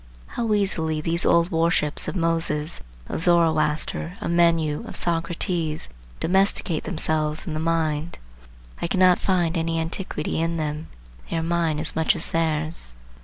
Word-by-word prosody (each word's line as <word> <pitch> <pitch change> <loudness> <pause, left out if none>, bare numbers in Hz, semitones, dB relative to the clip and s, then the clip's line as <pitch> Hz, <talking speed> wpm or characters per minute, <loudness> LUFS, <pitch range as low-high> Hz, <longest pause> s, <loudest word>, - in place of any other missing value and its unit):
How 230 -2 -2
easily 160 -6 +1
these 165 +2 0
old 170 +1 +4
worships 165 -2 +1
of - - -3
Moses, 165 -2 -1 0.3
of - - -3
Zoroaster, 165 0 +2
of - - -2
Menu, 165 -3 +2
of - - -7
Socrates, 170 - -1 0.3
domesticate 190 -2 +1
themselves 155 -1 -1
in 165 - -4
the 155 - -2
mind. 160 -1 -1 0.6
I - - 0
cannot 185 0 +4
find 180 -3 +1
any 165 0 0
antiquity 160 -2 -2
in 165 0 0
them. 155 0 -3 0.4
They 165 - -1
are 165 - -1
mine 165 -2 0
as 155 +1 -1
much 160 0 +3
as - - -4
theirs. 155 - -1
165 Hz, 145 wpm, -24 LUFS, 155-170 Hz, 0.6 s, old